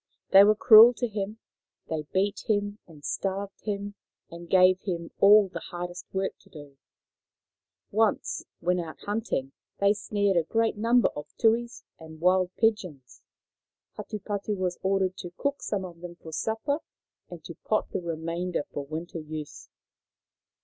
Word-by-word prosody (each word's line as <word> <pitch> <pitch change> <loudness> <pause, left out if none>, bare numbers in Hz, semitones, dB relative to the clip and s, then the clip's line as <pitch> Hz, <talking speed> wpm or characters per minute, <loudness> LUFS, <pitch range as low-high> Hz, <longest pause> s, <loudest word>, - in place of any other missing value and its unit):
They 195 +1 +9
were 210 +1 +5
cruel 230 +2 +8
to 240 +3 -1
him. 210 0 -4 0.5
They 155 -2 -4
beat 200 +2 -1
him 205 0 0
and 150 -4 -14
starved 195 +1 -3
him 205 -1 -3 0.4
and 170 0 -10
gave 185 0 +5
him 170 -3 -4
all 205 0 +7
the - - -7
hardest 175 0 -7
work 190 0 -2
to - - -23
do. 145 -3 -13 1.1
Once, 215 0 0 0.2
when 180 +1 +1
out 165 -2 -6
hunting, 205 - -2 0.3
they 200 +1 +4
snared 200 -2 0
a 170 - +3
great 225 +7 0
number 230 +3 +3
of 150 - -9
tuis 235 +1 +1 0.2
and 160 -1 -12
wild 185 +1 +3
pigeons. 180 - -1 0.7
Hatupatu 205 0 -4
was 180 -1 -2
ordered 190 -1 0
to 175 -1 -8
cook 280 0 -2
some 195 -3 -2
of 170 -2 -11
them 175 -1 -8
for 160 -2 -12
supper 225 - -1 0.5
and - - -10
to - - -8
pot - - -2
the - - -2
remainder 170 0 -3
for 145 - -4
winter 165 +3 -6
use. 155 -1 -8
190 Hz, 150 wpm, -27 LUFS, 170-210 Hz, 1.1 s, They